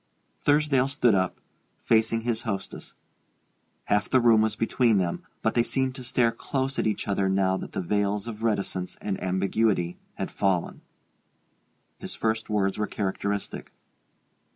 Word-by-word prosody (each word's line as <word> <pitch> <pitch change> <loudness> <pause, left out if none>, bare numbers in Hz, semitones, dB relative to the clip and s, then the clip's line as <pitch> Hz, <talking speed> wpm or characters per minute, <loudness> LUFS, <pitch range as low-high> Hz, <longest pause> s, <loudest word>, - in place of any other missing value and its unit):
Thursdale 145 -3 +3
stood 135 -5 +3
up, 95 -1 0 0.5
facing 115 0 +3
his 115 -1 -1
hostess. 100 -4 -5 0.9
Half 105 -1 +1
the 130 - +4
room 115 -2 +5
was 110 0 +1
between 115 0 +2
them, 90 -3 -1 0.2
but 110 - +2
they 120 - +4
seemed 130 +2 0
to 130 -1 -8
stare 120 -1 +2
close 135 +3 -2
at - - +1
each 105 - -2
other 100 -1 +1
now 95 0 +2
that - - -7
the - - -1
veils 100 +2 0
of 110 -2 -7
reticence 100 -5 -1
and 100 -2 -3
ambiguity 95 -1 0 0.2
had - - -4
fallen. 95 -3 0 1.2
His - - -7
first 110 0 -1
words 100 -1 0
were 105 - 0
characteristic. 100 0 -3
110 Hz, 150 wpm, -26 LUFS, 95-115 Hz, 1.2 s, room